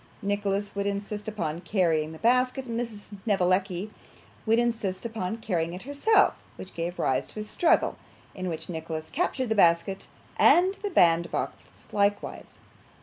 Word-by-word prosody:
Nicholas 205 0 -1
would 200 0 -2
insist 205 +1 -4
upon 170 -6 -3
carrying 165 -5 +1
the 160 - -9
basket, 255 +5 +2
and 235 -2 -4
Miss 230 -3 -5
Snevellicci 190 -1 +1 0.6
would 225 +1 +4
insist 230 -5 -1
upon 220 -2 -3
carrying 170 -7 -2
it 185 - -8
herself, 285 - +3 0.2
which 190 - -10
gave 170 +1 -4
rise 130 - 0
to - - -9
a - - -3
struggle, 335 +10 +2 0.4
in 185 -1 -4
which 160 -2 -5
Nicholas 160 -2 -5
captured 270 -8 -1
the - - +3
basket 190 0 +3 0.3
and 370 +2 +6
the 410 - -1
bandbox 170 - +1
likewise. 205 0 -1
200 Hz, 145 wpm, -27 LUFS, 175-230 Hz, 0.6 s, and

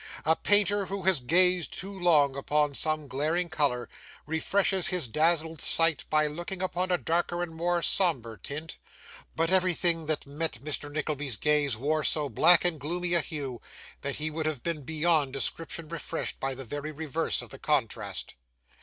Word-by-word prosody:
A 160 - +4
painter 205 0 +3
who 195 -1 -4
has 190 -4 +4
gazed 180 +6 +3
too 195 +2 -6
long 155 -7 +3
upon 145 +1 0
some 155 +1 0
glaring 155 +7 -1
colour, 140 -6 0 0.4
refreshes 185 +4 +1
his 180 -7 0
dazzled 160 +3 +1
sight 165 -2 +3
by 155 0 +3
looking 175 +5 -4
upon 185 0 -1
a 180 - +2
darker 175 +1 -1
and 170 -2 -6
more 170 +1 -1
sombre 125 - +1
tint; 155 - -6 0.6
but 165 +2 0
everything 175 -3 +2
that 155 -2 -1
met 150 +3 -2
Mr. 145 0 -3
Nickleby's 150 -5 -2
gaze 145 -4 +1
wore 150 +5 0
so 150 -2 0
black 170 +9 +6
and 170 -3 0
gloomy 175 +4 -2
a 170 - +5
hue, 140 -5 -5 0.4
that 140 0 -3
he 155 +1 -2
would 155 0 -2
have 150 -6 -3
been 165 -3 -2
beyond 155 -1 +1
description 160 +3 -3
refreshed 170 -1 -5
by 135 0 -2
the 135 0 -8
very 145 +5 -5
reverse 155 +1 -2
of - - -12
the - - -11
contrast. - - -1
160 Hz, 170 wpm, -28 LUFS, 145-175 Hz, 0.6 s, black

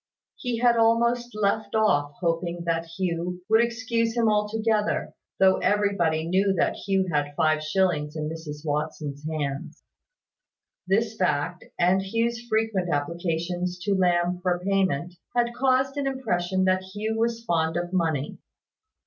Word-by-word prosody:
He 245 -4 -3
had 240 0 +4
almost 235 +1 +3
left 215 +1 0
off 145 -10 +2
hoping 170 0 -1
that 165 -1 -1
Hugh, 175 +1 -3
would 220 +1 +5
excuse 230 0 -1
him 230 -1 +3
altogether, 215 0 0 0.2
though 190 -1 +5
everybody 175 -6 +1
knew 190 +3 +2
that - - +1
Hugh 195 -1 0
had 145 -1 0
five 155 -1 +2
shillings 155 -2 0
in 155 -1 -2
Mrs 155 -1 -7
Watson's 150 -1 -3
hands. 145 -3 -4 1.0
This 215 +3 +1
fact 175 -2 -1
and 180 +2 +3
Hugh's 230 +4 -1
frequent 220 -5 0
applications 170 +4 -2
to 200 - +1
Lamb 180 -1 +2
for 180 -1 0
payment, 185 -4 +1 0.2
had 240 0 +1
caused 265 +1 +2
an 280 -1 0
impression 190 -9 0
that 185 0 +2
Hugh 205 +4 -4
was 230 0 0
fond 165 -3 +1
of 175 +1 -3
money. 160 -6 -1
185 Hz, 140 wpm, -25 LUFS, 165-220 Hz, 1.0 s, would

